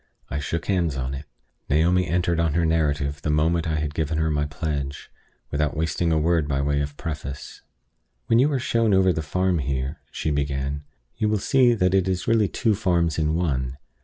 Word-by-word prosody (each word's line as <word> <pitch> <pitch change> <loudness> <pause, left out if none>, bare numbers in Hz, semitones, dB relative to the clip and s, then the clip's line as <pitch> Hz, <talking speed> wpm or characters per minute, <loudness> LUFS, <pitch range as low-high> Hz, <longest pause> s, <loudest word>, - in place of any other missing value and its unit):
I 70 - -1
shook 80 +3 -3
hands 85 -8 0
on 65 0 -3
it. 70 +3 -6 0.4
Naomi 85 +4 +3
entered 85 -1 +1
on 80 -2 +1
her 85 -1 +2
narrative 75 -3 0
the 75 - -2
moment 80 +2 +2
I 80 - 0
had 75 -1 -2
given 80 0 -1
her 80 0 +1
my 75 -1 0
pledge, 70 -1 -4 0.4
without 75 +1 0
wasting 80 +2 0
a 80 - +3
word 80 -1 +2
by 70 -2 0
way 70 +1 +1
of 70 0 -5
preface. 70 -4 -6 0.6
"When 115 - +3
you 140 +4 +4
are 140 - +1
shown 115 -4 +2
over 95 -1 +4
the 80 - -2
farm 90 +3 0
here," 65 0 -2
she 80 - -2
began, 70 0 -2 0.3
"you 110 -1 +1
will 105 - +2
see 125 +3 +3
that 90 -3 +2
it 95 -1 +3
is 95 -1 -1
really 110 -3 +3
two 110 +3 +1
farms 85 -6 +1
in 80 0 +1
one. 65 -7 -1
80 Hz, 200 wpm, -24 LUFS, 70-90 Hz, 0.6 s, you